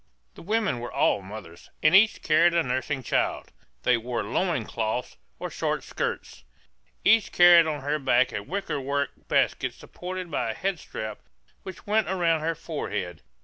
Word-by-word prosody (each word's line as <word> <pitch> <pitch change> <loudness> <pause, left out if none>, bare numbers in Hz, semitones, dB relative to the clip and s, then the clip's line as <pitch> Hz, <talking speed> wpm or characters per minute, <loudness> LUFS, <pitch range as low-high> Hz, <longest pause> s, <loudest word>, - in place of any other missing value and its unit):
The - - -13
women 210 - 0
were 120 - -6
all 135 -6 +2
mothers, 95 -3 -11
and 155 +4 +6
each 215 +3 +5
carried 170 +2 +4
a 170 - +3
nursing 130 +2 -2
child. - - -1 0.3
They 125 - +4
wore 120 0 -3
loin 130 - -1
cloths 115 +3 -3 0.2
or - - -5
short - - -2
skirts. - - -4 0.6
Each 225 -2 +4
carried 175 -2 +7
on 150 -2 -3
her 145 +2 -1
back 130 -2 +3
a 105 - -2
wickerwork 140 - -2 0.2
basket - - +1
supported 180 -1 -7
by 115 - -1
a 110 - -3
head 190 +2 -2
strap 110 -6 -6 0.4
which 190 -2 -10
went 215 -1 +1
around 170 -4 +2
her 165 +1 -1
forehead. 90 - -5
150 Hz, 160 wpm, -26 LUFS, 120-175 Hz, 0.6 s, carried